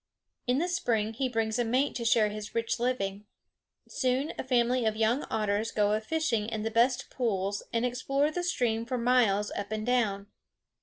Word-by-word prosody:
In 250 +1 +2
the 340 +5 +1
spring 230 - 0
he 255 +3 -1
brings 225 -1 -1
a - - +3
mate 255 +5 +1
to 235 - -4
share 225 -2 +4
his 210 0 -7
rich 230 0 -1
living. 210 -5 -1 0.6
Soon 260 +2 0
a - - -1
family 250 -1 +2
of 220 -1 +1
young 225 +5 +1
otters 215 +1 0
go 210 -1 +2
a 215 +1 +1
fishing 230 -5 -1
in 220 -2 -3
the 225 - -2
best 245 +3 +2
pools 200 -5 -1
and 235 +1 0
explore 275 +4 0
the 355 - -2
stream 240 -10 0
for 250 +2 -3
miles 235 -4 +2
up 205 +1 -5
and 215 0 -2
down. 220 -5 +1
230 Hz, 190 wpm, -29 LUFS, 215-255 Hz, 0.6 s, share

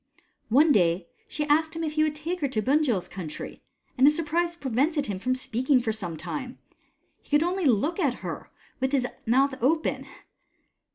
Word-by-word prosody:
One 295 +7 +5
day 170 -5 +2 0.2
she 300 - -3
asked 315 +2 +2
him 330 - -3
if 310 - -1
he 310 - +1
would 310 -1 +1
take 335 +4 -3
her 285 - 0
to 230 -5 -1
Bunjil's 255 - +1
country, 175 -5 -7 0.3
and 265 +1 +5
his 300 - +5
surprise 335 +2 0
prevented 285 +1 0
him 200 -6 -4
from 255 +5 0
speaking 255 +1 +1
for 235 -2 -1
some 180 -7 -4
time. 255 - -6 0.6
He - - -28
could 295 +1 +4
only 360 +1 -1
look 280 - +1
at 280 -8 +1
her, - - -6 0.3
with 265 +1 -1
his 265 -3 +2 0.2
mouth 265 +4 +3
open. 315 +6 0
275 Hz, 180 wpm, -26 LUFS, 235-310 Hz, 0.6 s, One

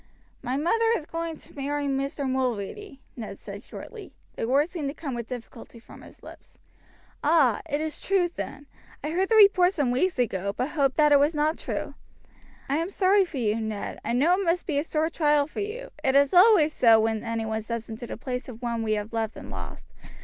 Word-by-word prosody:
"My 255 +1 -2
mother 450 +10 +2
is 300 - -8
going 330 0 -4
to - - -18
marry 290 +1 -2
Mr. 275 +1 -2
Mulready," 260 - -3
Ned 215 -4 -7
said 200 0 -9
shortly. 430 - -10 0.2
The 225 - -3
words 285 +6 +2
seemed 305 -6 -3
to 280 - -7
come 285 -5 -5
with 235 -1 -5
difficulty 235 -1 -9
from 230 - -14
his - - -16
lips. - - -14 0.7
"Ah! 290 -6 +4
it 290 - 0
is 310 -1 -4
true, 380 -2 +2
then. 290 -4 -7 0.4
I 300 - -2
heard 375 +3 0
the 450 - +3
report 395 -3 +6
some 285 -8 0
weeks 345 +8 +1
ago, 200 -5 -1
but 255 - -1
hoped 275 -5 0
that 300 -1 +5
it 285 - +7
was 295 +3 +2
not 305 +2 +1
true. - - -4 0.7
I 280 - 0
am 335 +3 -1
sorry 390 0 +3
for 330 -5 -8
you, 220 -2 0
Ned. 220 -2 -4
I 230 - -2
know 290 +9 +4
it 390 +2 +1
must 345 0 0
be 290 -4 0
a - - -1
sore 320 0 -1
trial 295 -3 +3
for 305 - -8
you; 455 +5 -5
it 265 0 +2
is 280 +2 +4
always 360 -5 +6
so 225 -2 +6
when 220 0 0
any 230 -1 -2
one 220 0 -2
steps 230 +1 -5
into 230 +2 -7
the - - -6
place 250 +2 -5
of 240 0 -10
one 235 -1 -1
we 220 -1 0
have 210 +1 -3
loved 225 -1 -2
and - - -9
lost." - - -8
280 Hz, 220 wpm, -26 LUFS, 235-330 Hz, 0.7 s, it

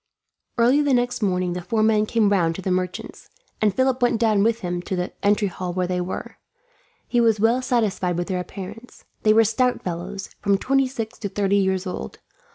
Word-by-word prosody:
Early 245 +5 +4
the 285 -3 +2
next 245 0 0
morning 180 -3 0
the 180 - -4
four 215 +5 0
men 215 -1 +3
came 220 -3 +2
round 170 -4 +2
to 190 - -6
the 185 - -1
merchant's, 180 0 -4 0.3
and 215 -1 +4
Philip 260 +3 +1
went 240 -2 +2
down 220 -3 +3
with 230 +2 +1
him 180 -2 -2
into 180 +2 -4
the 180 0 -3
entry 205 0 +2
hall 180 -1 -5
where 180 0 0
they 180 0 -1
were. 180 +1 -6 0.7
He 240 - +2
was 225 -2 +3
well 230 +4 +3
satisfied 215 -8 0
with 175 - -2
their 185 -2 -1
appearance. 205 +6 -9 0.2
They 215 - +4
were 225 +1 +6
stout 250 +3 +1
fellows, 185 +3 -5
from 200 -1 +2
twenty 270 +5 +2
six 230 -4 -6
to 200 - -3
thirty 200 0 +1
years 190 -1 +1
old. 180 - -6
205 Hz, 205 wpm, -23 LUFS, 185-230 Hz, 0.7 s, were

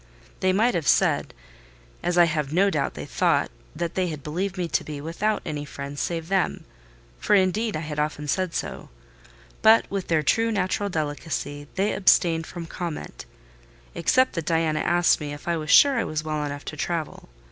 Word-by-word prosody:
They 185 - +2
might 225 +6 +2
have 165 -4 -2
said, - - +3 0.7
as 175 0 -1
I 175 - +8
have 150 -4 -2
no 195 +5 +3
doubt 150 -5 -1
they - - -6
thought, - - +1 0.2
that 170 0 -3
they 185 -1 0
had 155 -4 -6
believed 185 +5 -3
me 180 -2 -1
to - - 0
be 150 -2 -6
without 185 +8 -1
any 145 -1 -4
friends 140 0 -6
save 165 -2 -3
them: 190 0 0 0.6
for, 210 - +3
indeed, 200 +2 +1
I - - -4
had 150 -2 -5
often 150 0 -2
said 185 +2 -1
so; - - -4 0.7
but, 220 +1 +6
with 195 -2 -3
their 160 -2 +2
true 225 +10 +2
natural 200 0 -1
delicacy, 145 -2 -4
they 200 +2 +1
abstained 165 -4 +3
from 170 -2 -7
comment, 165 - -6 0.7
except 260 0 +2
that 165 -3 -4
Diana 160 -2 +1
asked 175 +1 +3
me 145 -1 -4
if 145 - -11
I 170 - +1
was 155 -1 -5
sure 275 - +6
I - - +1
was 155 0 -3
well 155 -1 -2
enough 145 0 -5
to - - -6
travel. 160 - -4
165 Hz, 190 wpm, -25 LUFS, 150-190 Hz, 0.7 s, I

